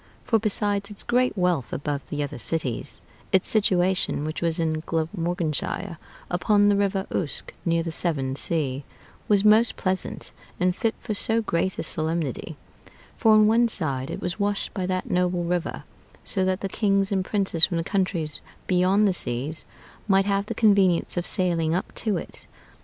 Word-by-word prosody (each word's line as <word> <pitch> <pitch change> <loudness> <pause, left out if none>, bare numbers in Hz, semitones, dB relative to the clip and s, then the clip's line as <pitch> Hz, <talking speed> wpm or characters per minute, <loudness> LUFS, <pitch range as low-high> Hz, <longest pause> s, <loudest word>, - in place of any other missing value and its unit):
For 225 - +2
besides 205 -1 0
its 205 - -2
great 250 -1 +1
wealth 180 -8 0
above 145 0 -3
the 145 0 -2
other 140 -3 -6
cities, 130 -1 -2 0.3
its 190 - +3
situation, 185 -6 +2
which 155 +1 -4
was 165 -1 0
in 160 -2 0
Glamorganshire, 170 +1 -2 0.3
upon 205 +3 +3
the 205 - +4
River 195 -1 0
Uske, 150 -7 -2
near 165 -1 +1
the 165 - -4
Severn 140 -6 0
Sea, 140 -3 0 0.4
was 205 -1 +3
most 220 +2 +5
pleasant 185 -1 -3 0.3
and 180 0 +2
fit 225 +2 -1
for 215 - -4
so 225 +2 +1
great 185 -1 -1
a - - -2
solemnity; 160 -2 -2 0.6
for 225 -3 +4
on 215 0 +6
one 230 +2 +4
side 135 - -1
it - - -5
was 180 +3 -3
washed 205 0 -1
by 185 -3 -2
that 185 0 -2
noble 180 -1 +1
river, 175 0 -2 0.4
so 190 - 0
that 185 0 0
the 195 - -1
kings 195 -1 +1
and 190 -2 +1
princes 190 -4 +1
from 175 - -2
the 165 - -1
countries 175 -5 -1 0.2
beyond 185 +3 +3
the 190 - +2
seas 140 +1 -2 0.4
might 195 -1 +4
have 200 0 0
the - - -4
convenience 195 -5 +3
of 175 -1 -2
sailing 170 -4 0
up 180 - -3
to 210 -5 -1
it. - - -9
180 Hz, 170 wpm, -25 LUFS, 165-200 Hz, 0.6 s, on